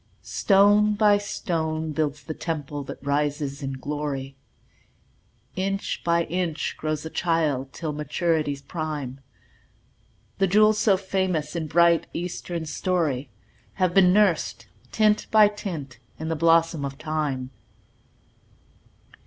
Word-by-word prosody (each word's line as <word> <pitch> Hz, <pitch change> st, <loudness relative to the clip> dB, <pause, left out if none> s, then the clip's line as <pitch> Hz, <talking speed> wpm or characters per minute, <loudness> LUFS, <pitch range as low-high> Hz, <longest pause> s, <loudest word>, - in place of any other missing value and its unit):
Stone 205 Hz, +1 st, +4 dB
by 205 Hz, -1 st, +4 dB
stone 160 Hz, -5 st, -2 dB
builds 150 Hz, -2 st, -2 dB
the 155 Hz, -, -5 dB
temple 150 Hz, -3 st, -4 dB
that -, -, -7 dB
rises 145 Hz, 0 st, -1 dB
in 135 Hz, -1 st, -3 dB
glory, 140 Hz, -1 st, -4 dB, 1.2 s
Inch 195 Hz, +1 st, -2 dB
by 170 Hz, 0 st, +2 dB
inch 170 Hz, -2 st, -2 dB
grows 155 Hz, -1 st, -3 dB
the 160 Hz, -, -5 dB
child 155 Hz, -6 st, 0 dB
till 155 Hz, -1 st, -4 dB
maturity's 150 Hz, -2 st, -1 dB
prime; 150 Hz, -4 st, -5 dB, 1.2 s
The 195 Hz, -, +3 dB
jewels 215 Hz, +2 st, +4 dB
so 200 Hz, -3 st, +4 dB
famous 185 Hz, -5 st, -1 dB
in 165 Hz, -2 st, -2 dB
bright, 170 Hz, +1 st, +4 dB
Eastern 170 Hz, -1 st, -4 dB
story 155 Hz, -5 st, -1 dB, 0.4 s
Have 185 Hz, -3 st, +1 dB
been 185 Hz, -2 st, +6 dB
nursed, 200 Hz, -4 st, +2 dB, 0.3 s
tint 215 Hz, -1 st, +2 dB
by 215 Hz, -1 st, +7 dB
tint, 160 Hz, -, -6 dB, 0.2 s
in 160 Hz, +1 st, -5 dB
the 165 Hz, -, 0 dB
blossom 165 Hz, -1 st, +3 dB
of 135 Hz, -1 st, -5 dB
Time. 150 Hz, -5 st, -3 dB
160 Hz, 120 wpm, -25 LUFS, 145-185 Hz, 1.2 s, by